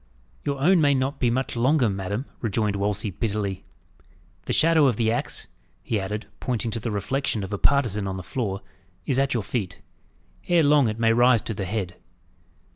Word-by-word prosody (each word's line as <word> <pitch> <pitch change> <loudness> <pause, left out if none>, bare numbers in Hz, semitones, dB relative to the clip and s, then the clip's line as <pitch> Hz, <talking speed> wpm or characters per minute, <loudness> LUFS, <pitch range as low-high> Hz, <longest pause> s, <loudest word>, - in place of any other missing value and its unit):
"Your 140 -1 -2
own 175 +5 +4
may 140 -2 +4
not 135 +2 -1
be 125 - +2
much 130 +2 -1
longer, 130 +2 +3
madam," 100 +5 -3
rejoined 105 -2 0
Wolsey 100 +1 -1
bitterly. 100 -2 -2 0.8
"The - - -3
shadow 160 -2 +5
of 125 - +2
the 110 0 +1
axe," 120 - -2 0.4
he 110 - -1
added, 105 +3 -4
pointing 120 -3 -2
to 115 - -3
the 115 - -3
reflection 105 +2 -1
of 95 - -6
a 100 - -2
partisan 115 -8 +2
on 95 0 -3
the 95 - -6
floor, 100 -1 -3 0.4
"is 135 - +1
at 135 -2 +1
your 115 - 0
feet. 95 -5 -4 0.6
Ere 175 -2 +4
long 145 -3 +5
it 110 0 -2
may 115 0 +3
rise 120 -1 +4
to 110 - -4
the 100 -2 -4
head." 90 -2 -3
115 Hz, 190 wpm, -24 LUFS, 100-135 Hz, 0.8 s, shadow